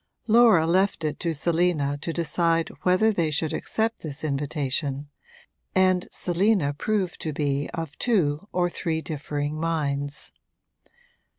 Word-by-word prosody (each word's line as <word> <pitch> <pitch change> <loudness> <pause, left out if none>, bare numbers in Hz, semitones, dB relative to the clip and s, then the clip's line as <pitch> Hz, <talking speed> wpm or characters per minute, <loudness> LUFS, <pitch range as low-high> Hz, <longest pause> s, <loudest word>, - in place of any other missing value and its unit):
Laura 220 -7 +6
left 185 +1 +2
it 150 -1 -2
to 170 - -1
Selina 160 -2 +1
to 150 +3 -4
decide 165 0 0
whether 185 +5 +3
they 170 -5 +1
should 150 +1 -1
accept 225 +1 -1
this 155 -1 -7
invitation, 140 -1 -2 0.7
and 185 -1 +3
Selina 180 -4 +1
proved 190 +3 -2
to 155 - -2
be 145 -1 -1
of 160 -3 -5
two 185 -7 +1
or 180 -1 +1
three 165 -2 -2
differing 145 0 -3
minds. 145 -3 -2
165 Hz, 125 wpm, -25 LUFS, 145-180 Hz, 0.7 s, Laura